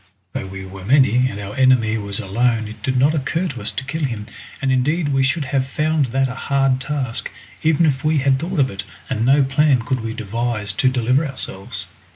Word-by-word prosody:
Though 95 - -4
we 95 0 -7
were 95 0 -10
many 130 +1 +4
and 100 - -6
our 100 0 -6
enemy 130 -4 +4
was 100 -1 -2
alone 115 +3 0
it 110 - -10
did 130 -1 0
not 140 +4 +4
occur 160 +5 -1
to - - -7
us - - 0
to - - -4
kill 155 +4 -3
him, 115 -6 -2 0.3
and 135 - 0
indeed 145 +5 +1
we 135 - +3
should 140 +3 +1
have 130 0 0
found 150 0 +1
that 135 +2 +1
a 125 - -5
hard 135 0 +1
task, 135 -5 -2 0.3
even 160 +1 +3
if 135 -3 0
we 155 0 +2
had 135 -1 +2
thought 175 +4 -3
of 135 -2 +3
it, 95 - -5 0.3
and 115 -3 0
no 135 +3 +5
plan 135 -2 +3
could 130 +1 -1
we 115 0 -4
devise 110 -1 -2
to 130 +6 +2
deliver 130 +3 +2
ourselves. 95 - -5
130 Hz, 215 wpm, -20 LUFS, 115-140 Hz, 0.3 s, no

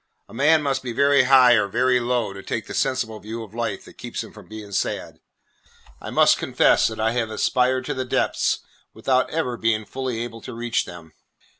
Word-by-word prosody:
A - - -16
man 150 +5 +3
must 140 -2 0
be 125 -2 -5
very 140 +1 +4
high 130 -2 +7
or 105 -4 +3
very 125 +4 +2
low 120 -4 -1
to 100 - -9
take 110 - -4
the - - -8
sensible 115 -5 -1
view 110 +3 -6
of 105 -2 -13
life 115 -4 -3
that - - -16
keeps - - -5
him - - -13
from - - -14
being 110 -2 -9
sad. 95 - -3 0.8
I - - -7
must - - +4
confess - - +3
that 110 -1 -6
I 110 +1 +1
have 115 -2 -1
aspired 130 +3 +1
to - - -2
the 130 - -3
depths 125 - 0 0.3
without 130 -1 +1
ever 140 -7 -2
being 110 -1 0
fully 130 -1 -4
able 115 -1 -8
to 125 - -8
reach 120 0 -1
them. 85 -2 -12
120 Hz, 205 wpm, -23 LUFS, 110-130 Hz, 0.8 s, high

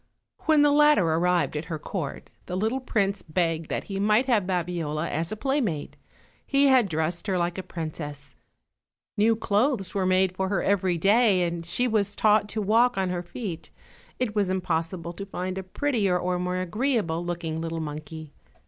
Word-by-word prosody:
When 310 -2 +5
the 295 - +5
latter 295 - +5
arrived 170 +1 +1
at 150 +2 -3
her 165 -1 -4
court 155 -2 -5 0.2
the 180 - -3
little 220 +7 0
prince 200 -6 0
begged 165 -1 -1
that - - -2
he 195 -1 -5
might 210 +5 +3
have 220 -8 +2
Babiola 170 -4 -2
as 165 +2 -2
a 215 - -4
playmate. 235 - -1 0.5
He 280 0 +2
had 260 -4 +5
her - - -6
dressed 160 +4 -2
like 175 -1 0
a - - -2
princess; 150 -5 -6 0.8
new 220 +2 +3
clothes 215 -2 0
were 190 -2 0
made 185 0 +2
for 190 0 -1
her 195 - 0
every 190 -3 +1
day, 200 +1 +4
and 170 -1 -2
she 180 +9 0
was 205 -3 0
taught 210 -1 +3
to 215 - -2
walk 230 +4 +3
on 190 -1 0
her 180 -1 -2
feet; 175 -1 -6 0.5
it 245 -4 -1
was 200 -3 +1
impossible 170 -1 -2
to 200 +3 -7
find 185 0 -4
a - - -5
prettier 200 -2 0
or 180 0 -1
more 180 0 -2
agree 225 +9 0
able 170 -5 -2
looking 165 -2 -3
little 165 0 -3
monkey. 155 0 -7
185 Hz, 185 wpm, -26 LUFS, 170-215 Hz, 0.8 s, When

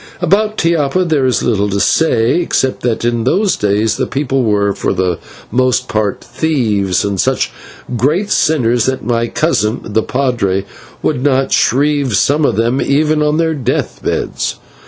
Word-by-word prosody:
About 210 +4 +1
Tiapa 165 +1 +1
there 150 -6 +1
is 125 - 0
little 105 -3 +1
to 100 0 -1
say, 120 - +2
except 130 -6 -1
that 120 -1 -1
in 120 -1 0
those 190 - +1
days 105 +2 0
the - - -1
people 135 -1 -1
were 100 -3 +1
for - - -2
the 90 -2 -1 0.3
most 125 +1 +1
part 105 -2 -2
thieves, 115 - 0
and 100 -2 0
such - - 0 0.5
great 160 - 0
sinners 120 -7 +2
that 130 0 -2
my 115 -1 0
cousin, 115 -7 0
the 110 +1 0
/padre/ 115 -8 -1 0.4
would 125 - 0
not 135 -2 +1
shrive 140 -1 +2
some 145 +9 +2
of - - +1
them, 115 +4 +1
even 150 +2 +1
on 150 0 +1
their 165 -1 +1
death 130 -4 -2
beds. - - -2
130 Hz, 160 wpm, -15 LUFS, 110-150 Hz, 0.5 s, say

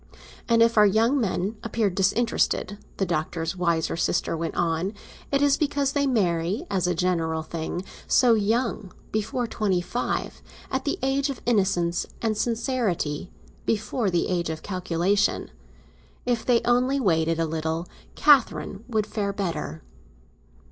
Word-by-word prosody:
And 230 0 +6
if 230 -1 +3
our 210 - +8
young 230 +7 +3
men 200 0 -1
appear 225 -3 0
disinterested," 200 0 +1 0.2
the 195 - +1
Doctor's 165 0 -2
wiser 170 -3 0
sister 175 0 0
went 165 0 -3
on, 170 +4 0 0.4
"it 280 0 +2
is 285 -1 +4
because 285 -2 0
they 280 -1 +1
marry, 190 - 0
as 185 -3 +1
a 180 - +1
general 165 -2 0
thing, 165 +2 -4 0.2
so 245 -3 +5
young; 220 -2 0 0.2
before 215 +3 -1
twenty 210 -5 0
five, 240 +7 -3 0.3
at 265 - -1
the 285 - 0
age 275 +2 +1
of 270 - -4
innocence 190 -6 +1
and 220 -2 0
sincerity, 220 - -1 0.4
before 220 0 0
the 175 -2 +1
age 175 -2 -1
of 160 -1 -5
calculation. 185 +1 0 0.7
If 240 -2 -1
they 240 -2 +4
only 250 +3 +2
waited 165 -7 +1
a 165 - +2
little, 160 +1 -2 0.3
Catherine 270 -7 +3
would 220 -4 0
fare 205 -2 -2
better." 165 - -4
200 Hz, 140 wpm, -25 LUFS, 170-235 Hz, 0.7 s, our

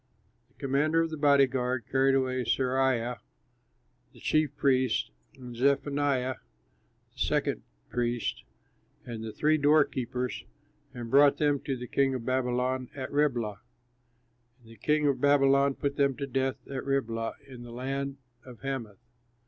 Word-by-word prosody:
The 130 - -35
commander 145 +4 +1
of 165 - -4
the - - -3
body 140 -2 +5
guard 125 -2 -2
carried 135 0 +3
away 130 -1 0
Seraiah, 125 -1 +1 0.9
the - - -16
chief 155 -3 +1
priest 130 -4 +1 0.2
and 125 -2 -10
Zephaniah, 140 0 +1 0.8
the - - -19
second - - 0 0.3
priest, 120 -1 -2 0.6
and 115 -3 -6
the 110 - -5
three 155 +6 +2
doorkeepers 130 -4 +1 0.5
and 120 -3 -7
brought 140 +1 +6
them 145 -2 +2
to 135 -1 -3
the 125 - -6
king 135 +1 +1
of 120 -3 -5
Babylon 130 0 0
at 130 -2 -5
Riblah. 120 -9 0 1.0
And 115 - -16
the 115 - -14
king 150 +7 +1
of 135 -3 +1
Babylon 140 -1 +4
put 140 0 -2
them 140 -2 +2
to 140 - -3
death 135 -1 -2
at 135 -2 -5
Riblah 115 -5 -1
in 130 -3 -11
the 120 - -10
land 135 +3 -3 0.3
of 125 -3 -13
Hamath. 130 -7 -4
130 Hz, 145 wpm, -29 LUFS, 125-140 Hz, 1.0 s, brought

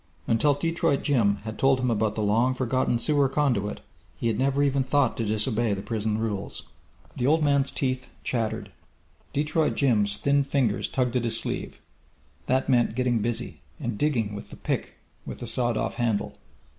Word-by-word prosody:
Until 140 +6 +3
Detroit 165 -1 0
Jim 115 -8 +3
had 110 -1 -6
told 135 -1 +4
him 125 -1 +1
about 110 -1 0
the 110 - -1
long 115 +5 +2
forgotten 130 -1 +1
sewer 140 +2 +2
conduit, 120 -9 0 0.4
he - - -5
had 115 -1 +1
never 140 +2 +2
even 140 -1 +2
thought 130 -1 +2
to 115 - -1
disobey 110 +1 +1
the 95 - -6
prison 110 -1 -1
rules. 105 -3 -3 0.5
The 125 - 0
old 155 +2 +3
man's 140 -2 +3
teeth 130 -2 -2
chattered. 115 -3 -2 0.6
Detroit 150 +2 +1
Jim's 105 -7 +2
thin 140 0 +2
fingers 135 -6 0
tugged 125 -1 0
at 120 - -1
his 115 -1 0
sleeve. - - -4 0.7
That 130 +1 +1
meant 120 -4 +2
getting 125 -2 +1
busy, 115 +2 -3 0.2
and 120 -2 -3
digging 115 -5 0
with 105 - -8
the - - -11
pick - - -3 0.3
with - - -7
the - - -6
sawed 120 0 0
off - - -1
handle. 115 -4 0
125 Hz, 175 wpm, -26 LUFS, 110-140 Hz, 0.7 s, told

